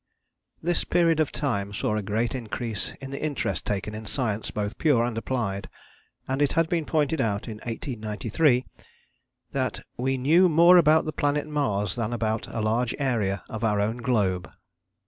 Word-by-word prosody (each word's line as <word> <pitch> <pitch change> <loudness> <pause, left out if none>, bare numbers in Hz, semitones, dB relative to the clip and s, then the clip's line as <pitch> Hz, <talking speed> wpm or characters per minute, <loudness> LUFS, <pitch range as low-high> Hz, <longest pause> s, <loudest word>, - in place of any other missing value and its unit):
This 175 +1 +1
period 165 -2 +2
of 155 - +2
time 100 -9 -2
saw 105 - 0
a 105 - 0
great 110 +4 -1
increase 115 -3 -4
in 135 0 -7
the 140 - -5
interest 150 -2 -2
taken 105 +1 -2
in 110 0 -7
science 110 -5 -2
both 105 +2 -4
pure 140 -7 +4
and 120 -1 -2
applied, 115 -4 -2 0.6
and 135 +2 -1
it 145 - +2
had 165 0 +3
been 170 -3 0
pointed 155 -1 +1
out 105 -3 -1
in 110 -2 -6
1893 115 +3 0 0.9
that - - -2 0.2
"we 130 +2 0
knew 165 +8 +5
more 170 +3 +7
about 160 -1 +5
the 155 - -3
planet 145 +1 0
Mars 135 -10 -1
than 115 -1 -2
about 110 -1 -1
a 115 - -4
large 115 +3 0
area 110 -9 0
of 110 0 -6
our 105 -2 +2
own 110 +3 0
globe." 100 -8 0
120 Hz, 170 wpm, -26 LUFS, 105-145 Hz, 0.9 s, more